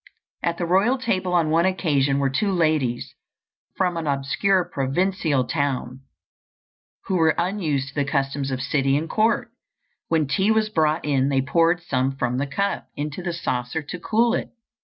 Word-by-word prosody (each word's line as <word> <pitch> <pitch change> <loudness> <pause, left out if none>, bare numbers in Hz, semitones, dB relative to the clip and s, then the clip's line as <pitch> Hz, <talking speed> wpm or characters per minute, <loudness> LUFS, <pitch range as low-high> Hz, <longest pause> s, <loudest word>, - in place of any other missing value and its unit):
At 170 0 -1
the 175 - -1
royal 195 +9 +3
table 190 -8 -1
on 165 -3 +2
one 165 +3 +3
occasion 145 -7 +1
were 135 -1 +1
two 200 +9 0
ladies 155 -9 0 0.6
from 180 -2 0
an 165 -2 -3
obscure 145 +7 +1
provincial 145 0 0
town 135 -3 -2 1.1
who 190 - 0
were 160 -2 +3
unused 170 -7 -1
to - - -14
the 145 - 0
customs 135 -1 -1
of 130 -1 -3
city 135 0 +1
and 160 +2 -3
court. 230 +4 +1 0.6
When 160 -2 +2
tea 190 +9 +1
was 220 -1 +2
brought 155 -4 +1
in 140 -2 +2
they 135 -1 +1
poured 170 +5 +2
some 135 -4 0
from 125 -1 -1
the 140 - -1
cup 200 +8 -2
into 150 +3 -4
the 175 -1 -3
saucer 130 -2 -3
to 175 +5 -7
cool 230 +6 +2
it. - - -2
155 Hz, 170 wpm, -23 LUFS, 135-185 Hz, 1.1 s, royal